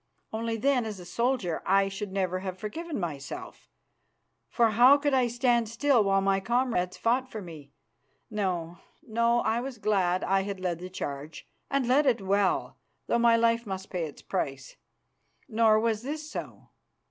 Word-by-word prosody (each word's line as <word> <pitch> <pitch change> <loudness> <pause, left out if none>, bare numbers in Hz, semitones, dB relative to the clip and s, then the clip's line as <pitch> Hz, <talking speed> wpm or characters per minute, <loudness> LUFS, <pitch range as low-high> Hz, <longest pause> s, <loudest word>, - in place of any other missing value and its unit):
Only 225 +1 -2
then, 250 -1 +1
as 210 -3 -6
a 180 - -10
soldier, 235 -2 -1
I 195 +1 +3
should 195 0 -5
never 185 -1 -1
have 185 -1 -5
forgiven 295 - -5
myself, 150 -6 -6 0.8
for 230 - +3
how 250 +6 +7
could 290 -1 0
I 255 -2 +3
stand 240 -1 +1
still 240 0 +3
while 195 -1 +2
my 195 0 +2
comrades 230 -5 0
fought 255 +3 +1
for 220 - -6
me? 155 -7 -11 0.6
No, 175 -5 -2 0.3
no, 235 +1 +2
I 225 +2 0
was 260 -1 -6
glad 190 -4 +1
I 195 0 +2
had 195 -1 -5
led 180 -2 -2
the 180 +1 -7
charge 145 -4 -6 0.2
and 275 -2 +1
led 275 +4 +4
it 250 - +3
well, 195 0 0 0.3
though 235 - +1
my 235 -1 +5
life 230 0 +2
must 190 -1 -6
pay 175 -3 -1
its 150 - -10
price. 135 -2 -4 0.7
Nor 220 -1 +4
was 220 -1 0
this 300 +4 -5
so. - - -7
215 Hz, 170 wpm, -28 LUFS, 185-240 Hz, 0.8 s, how